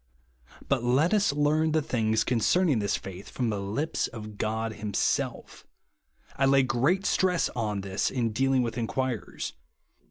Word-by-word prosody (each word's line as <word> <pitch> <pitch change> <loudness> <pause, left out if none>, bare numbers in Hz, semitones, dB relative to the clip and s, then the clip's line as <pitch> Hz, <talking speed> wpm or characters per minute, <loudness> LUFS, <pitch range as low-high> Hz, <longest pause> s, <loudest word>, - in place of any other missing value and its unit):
But 135 -4 +1
let 135 - +3
us 205 -4 +3
learn 150 +2 +2
the 160 - +3
things 110 -4 +1
concerning 135 - +2
this 100 -1 0
faith, 95 0 -8
from 120 -3 -1
the 105 - -2
lips 110 +11 -1
of 110 -2 -9
God 110 +1 -1
himself, 105 -1 -2 0.7
I 135 - +2
lay 135 0 +5
great 135 +11 +1
stress 180 -3 +2
on 105 -4 -2
this 95 0 -1
in 120 -4 -1
dealing 130 +3 +2
witli 115 0 -3
inquirers. 120 -2 -3
120 Hz, 150 wpm, -27 LUFS, 110-145 Hz, 0.7 s, lay